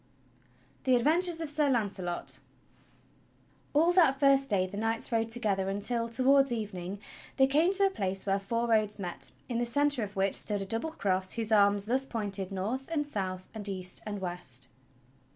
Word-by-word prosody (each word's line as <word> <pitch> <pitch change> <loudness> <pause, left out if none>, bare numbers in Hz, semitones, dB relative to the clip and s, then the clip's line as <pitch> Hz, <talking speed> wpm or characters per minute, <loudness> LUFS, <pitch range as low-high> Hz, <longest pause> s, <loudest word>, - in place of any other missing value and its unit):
THE 260 -1 +3
ADVENTURES 330 +7 +2
OF 320 - -3
SIR 295 -1 +1
K\UNCELOT 195 -6 -1 1.4
All 330 +4 +4
that 320 -7 +4
first 275 -1 +4
day 190 -4 +2
the 185 +2 -8
knights 225 +3 -1
rode 225 -1 0
together 205 -5 0
until, 230 +4 0
towards 270 +3 +3
eve 215 -3 -3
ning, 180 +2 -6 0.4
they 265 - +6
came 305 +7 +3
to 395 0 +2
a 390 - +2
place 195 - -3
where 195 0 +1
four 230 +4 -2
roads 215 -2 +1
met, 180 -4 -2 0.2
in 235 -2 -2
the 240 - 0
centre 285 +1 +2
of 205 -1 -5
which 195 0 +1
stood 205 -2 +2
a - - -7
double 230 +10 -3
cross 185 -4 0
whose 225 -1 -1
arms 200 -1 +4
thus 260 +4 0
pointed 200 -5 -3
north 220 +9 -3
and 295 -3 0
south 185 -8 -4
and 205 -2 -4
east 185 -2 -2
and 205 -2 -5
west. 175 -9 -6
220 Hz, 180 wpm, -29 LUFS, 195-270 Hz, 1.4 s, they